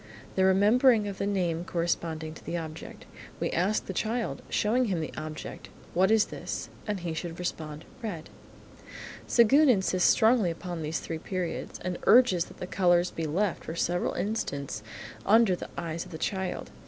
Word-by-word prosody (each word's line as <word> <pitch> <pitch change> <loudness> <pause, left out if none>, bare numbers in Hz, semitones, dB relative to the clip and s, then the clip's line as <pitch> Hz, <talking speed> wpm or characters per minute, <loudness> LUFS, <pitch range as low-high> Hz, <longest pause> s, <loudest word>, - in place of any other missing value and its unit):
The 190 - +3
remembering 210 +4 +5
of 200 -1 -6
the 200 - 0
name 175 -4 0
corresponding 165 -2 -2
to - - -13
the 175 - -3
object. 160 -1 -8 0.3
We - - -1
ask 190 +5 +1
the 190 - -5
child, 225 +5 -2
showing 240 +4 +2
him 190 -6 -1
the 155 - -4
object, 155 0 -7 0.2
"What 190 +2 +3
is 220 -1 +5
this?" - - -5 0.2
and 205 -3 -2
he 170 -2 -3
should 165 +1 -5
respond, 155 -3 -5 0.2
"Red." 180 -9 -5 1.0
Séguin 270 +6 +6
insists 190 -5 +3
strongly 220 -4 +4
upon 170 0 -5
these 155 +1 -2
three 165 -1 -5
periods, 180 0 -4
and 180 0 -3
urges 230 -8 +6
that - - -15
the - - -5
colours 175 -1 +2
be 165 -1 -3
left 185 +5 0
for 160 - -5
several 175 +1 0
instants 140 - -3 0.4
under 215 -2 +5
the - - -8
eyes 165 0 -3
of 185 - -13
the 160 - -6
child. 190 +2 -3
180 Hz, 170 wpm, -28 LUFS, 165-210 Hz, 1.0 s, Séguin